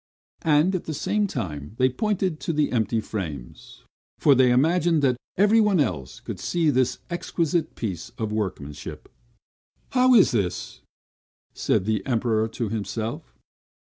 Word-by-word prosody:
and 155 +4 +3
at 185 - -2
the 155 - -4
same 210 +7 0
time 80 - -5
they 130 - +4
pointed 185 - -1
to - - -2
the 150 -2 +1
empty 115 -1 +1
frames; 80 - -7 0.3
for 145 - +5
they 130 -1 +5
imagined 160 +4 +3
that 130 -2 +3 0.2
everyone 210 -1 +4
else 75 - -2
could - - -7
see 165 -3 +1
this 130 -2 +1
exquisite 170 -2 -1
piece 95 -7 -4
of 110 -2 -3
workmanship. 95 -9 -5 0.8
"How 255 0 +5
is 205 - +6
this?" 100 -7 -2 0.7
said 95 - 0
the 110 -1 0
Emperor 110 -3 +1
to 115 0 -4
himself. 110 +1 -4
130 Hz, 140 wpm, -24 LUFS, 110-170 Hz, 0.8 s, is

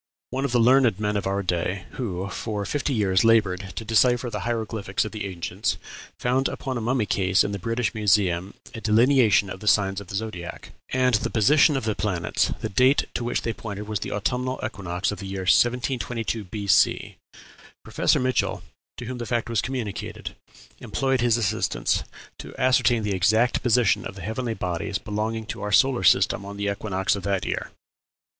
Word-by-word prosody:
One 135 +1 -1
of 140 - -2
the 120 - +3
learned 120 -3 +4
men 105 0 -1
of 100 - -1
our 100 +1 -1
day, 90 +1 -2
who 95 -6 -4
for 105 -1 -4
fifty 145 +3 -2
years 95 -6 +2
labored 100 -5 +2
to 110 - -5
decipher 120 +2 +2
the - - -3
hieroglyphics 110 -4 -2
of 110 - -5
the 105 -2 -4
ancients, 95 +3 -3 0.4
found 130 +2 +1
upon 130 -2 -4
a 120 - -2
mummy 120 0 0
case 95 -1 +2
in 100 - -2
the 100 - -4
British 115 +4 -1
Museum 95 -3 +1 0.2
a 115 - -7
delineation 110 -1 +4
of 95 - -7
the 105 - -8
signs 100 -1 +3
of 100 - -12
the 95 - -6
zodiac, 95 -5 -6 0.2
and 130 -1 +2
the 105 - +1
position 145 +6 +4
of 135 - -3
the 110 - +1
planets; 95 -5 -1
the - - -1
date 125 +7 +3
to 120 - -3
which 120 +1 -1
they 115 - -1
pointed 105 -2 -7
was 105 -2 -2
the - - -5
autumnal 125 +5 -2
equinox 90 -1 -3
of 105 - -6
the 100 - -6
year 95 0 -4
1722 120 +1 +1
B.C. 100 +1 +1 0.7
Professor - - +1
Mitchell, 125 -6 0 0.3
to 120 - -6
whom 125 +1 -5
the 120 - -5
fact 120 -1 -1
was 115 - +1
communicated, 125 -6 -5 0.4
employed 135 -2 -1
his 120 -1 +3
assistants 95 - 0 0.4
to - - -9
ascertain 125 -3 +3
the 105 -1 -1
exact 110 +6 +2
position 120 -2 +3
of - - -7
the 95 - -9
heavenly 115 +3 -3
bodies 90 0 -3
belonging 110 +2 -3
to - - -6
our 105 - -3
solar 130 +3 +4
system 100 - +4
on 100 0 -8
the 100 0 -1
equinox 100 -2 -1
of 100 - -5
that 100 -1 -1
year. - - -3
110 Hz, 190 wpm, -24 LUFS, 100-120 Hz, 0.7 s, learned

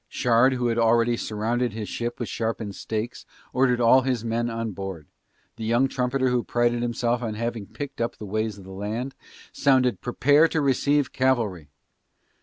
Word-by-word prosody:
Shard 125 +2 +3
who 125 -1 -2
had 115 -1 +1
already 115 +1 +3
surrounded 115 +2 -1
his 110 -1 -5
ship 120 0 -4
with 120 - -3
sharpened 110 -2 -3
stakes 110 +4 -4 0.3
ordered 125 -2 +2
all 120 +2 +6
his 125 -3 -1
men 115 +1 -1
on 115 -1 -3
board, 95 -5 -6 0.5
the 115 - -6
young 120 +4 +2
trumpeter 130 0 0
who 125 -1 +1
prided 120 0 +1
himself 120 0 0
on 110 -3 -3
having 115 -2 -3
picked 140 -3 -7
up 115 - -2
the 105 - -8
ways 110 +1 -2
of 100 - -12
the 95 - -11
land, 110 +7 -4 0.4
sounded 130 -3 +2
"Prepare 145 +6 +4
to 160 - -1
receive 140 0 +1
cavalry". 115 - 0
120 Hz, 175 wpm, -25 LUFS, 110-125 Hz, 0.5 s, all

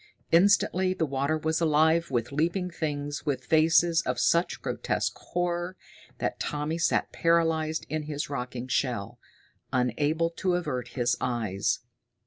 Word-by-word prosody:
Instantly 185 0 +4
the 160 - 0
water 140 +2 0
was 160 +1 -1
alive 160 +1 +3
with 120 -2 -1
leaping 175 +5 0
things 145 -3 -3
with 140 -4 -2
faces 165 +2 +4
of 125 -1 -2
such 170 +6 +2
grotesque - - -2
horror 175 +1 -3 0.4
that - - -2
Tommy 150 +3 -2
sat 170 - +1
paralyzed 165 -1 +1
in 155 0 -2
his 150 0 -3
rocking 125 -2 -5
shell, 120 -3 -1 0.5
unable 145 +7 +1
to 180 +1 0
avert 140 -9 -2
his 120 -1 +2
eyes. 110 -6 -1
155 Hz, 130 wpm, -27 LUFS, 130-170 Hz, 0.5 s, Instantly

